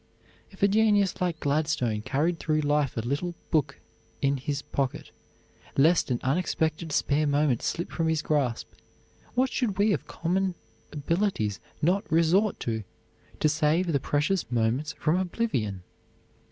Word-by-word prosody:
If 195 - -8
a - - +7
genius 205 -2 +3
like 175 -3 0
Gladstone 140 -7 0
carried 160 +9 0
through 155 -1 +1
life 145 -3 +1
a - - +1
little 145 +9 -2 0.2
book 150 -3 +1 0.4
in 140 -1 +1
his 140 +2 -3
pocket 135 -2 -3 0.7
lest 160 +4 +4
an 120 -2 0
unexpected 160 +2 0
spare 145 +1 +1
moment 145 -4 +2
slip 170 - -2
from 165 -1 -1
his 160 -1 0
grasp, 140 -6 -1 0.6
what 255 +1 +2
should 220 -7 -1
we 205 +1 +3
of 155 - -3
common 185 +2 -1 0.4
abilities 150 - -1 0.2
not 185 +5 +1
resort 170 +6 +3
to, 110 -2 -2 0.6
to - - +3
save 155 +3 +2
the 140 - +3
precious 145 - 0
moments 120 +7 0
from 160 +2 +1
oblivion? 170 - -2
155 Hz, 140 wpm, -27 LUFS, 140-180 Hz, 0.7 s, a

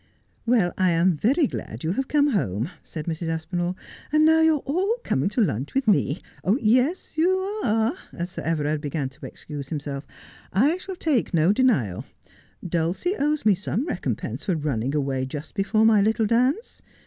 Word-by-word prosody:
' - - -40
Well, 225 -7 +3
I 185 -1 +4
am 170 +1 +3
very 270 - +2
glad 115 - -6
you 160 - 0
have 265 +7 -1
come 295 -1 +3
home,' 120 - -1
said 155 -2 -7
Mrs. 165 0 -3
Aspinall, 175 +2 -2 0.2
' - - -19
and 305 +1 +4
now 320 0 +5
you 320 -1 +5
are 290 - -5
all 375 +10 +1
coming 135 +8 0
to 220 +4 0
lunch 135 - -1
with 270 -3 +1
me. 150 -5 +2 0.4
Yes, 255 - +1
you 340 +3 +4 0.3
are,' 225 +3 +2 0.2
as 175 +1 -5
Sir - - -5
Everard 155 -2 -1
began 145 -2 -2
to 135 +3 -12
excuse 145 -3 -8
himself. 145 -2 -5 0.3
' - - -24 0.2
I 345 - -1
shall 380 0 -7
take 285 - 0
no 165 +4 +4
denial. 175 - +1 0.6
Dulcie 175 - 0
owes 300 - 0
me 210 - +6
some 205 - -2
recompense - - -3
for 185 - +1
running 140 -3 -1
away 135 -3 0
just 145 +3 -7
before 215 +2 +2
my 220 -2 +5
little 220 +2 +2
dance. 255 - 0
190 Hz, 185 wpm, -24 LUFS, -, 0.6 s, me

